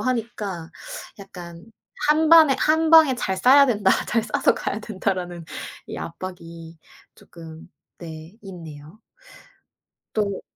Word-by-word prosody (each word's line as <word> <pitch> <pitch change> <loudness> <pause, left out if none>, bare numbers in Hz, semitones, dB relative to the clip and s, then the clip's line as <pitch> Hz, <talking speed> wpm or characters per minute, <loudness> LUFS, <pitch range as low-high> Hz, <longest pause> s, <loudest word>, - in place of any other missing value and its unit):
하니까 215 -9 -3 0.5
약간 175 -2 -11 0.4
'1 310 +1 +3
반에 315 -5 +7
1 320 +1 +2
방에 315 -5 +7
잘 190 -5 -2
싸야 265 +8 +6
된다. 205 -6 +2 0.2
잘 230 0 +1
싸서 215 - +1
가야 210 - -4
된다.'라는 185 -5 -4 0.4
이 - - -6
압박이 165 -2 -9 0.4
쪼끔 165 -1 -13 0.3
네 165 +4 -10
있네요. 165 -1 -11 1.1
또 200 -3 -1
190 Hz, 195 characters per minute, -23 LUFS, 170-240 Hz, 1.1 s, 반에